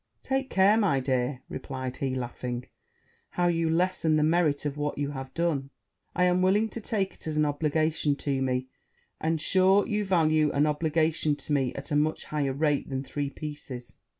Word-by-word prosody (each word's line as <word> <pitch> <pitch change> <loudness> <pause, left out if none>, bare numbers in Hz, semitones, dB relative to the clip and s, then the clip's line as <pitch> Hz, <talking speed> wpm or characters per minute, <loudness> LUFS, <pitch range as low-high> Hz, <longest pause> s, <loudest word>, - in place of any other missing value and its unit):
'Take 270 0 -1
care, 195 +3 +4
my 195 -11 +2
dear,' 130 0 -1 0.2
said 130 -2 -5
he, 135 -2 -2
laughing, 125 0 -4 0.6
'how 175 - 0
you 165 -2 +2
lessen 165 -1 +2
the 150 - +3
merit 155 -3 +2
of 145 -1 -2
what 150 0 -2
you 145 0 -2
have 135 -2 -6
done; 155 -5 0 0.5
I 180 - +2
am 180 0 +3
willing 205 +4 +3
to 230 - -6
take 200 -3 -1
it - - -9
as 155 -1 -2
an 155 - +3
obligation 150 0 +1
to 140 -2 -2
me; 130 -1 0 0.5
and, 160 0 0
sure, 190 +5 +4
you 210 0 0
value 155 -5 +3
an 145 +1 +3
obligation 155 0 +1
to 150 - -4
me 135 -3 +1
at 140 +3 -7
a - - +2
much 155 +2 +1
higher 145 -3 -1
rate 145 0 0
than 135 0 -2
three 145 0 -3
pieces.' 140 -5 -7
150 Hz, 185 wpm, -28 LUFS, 140-170 Hz, 0.6 s, care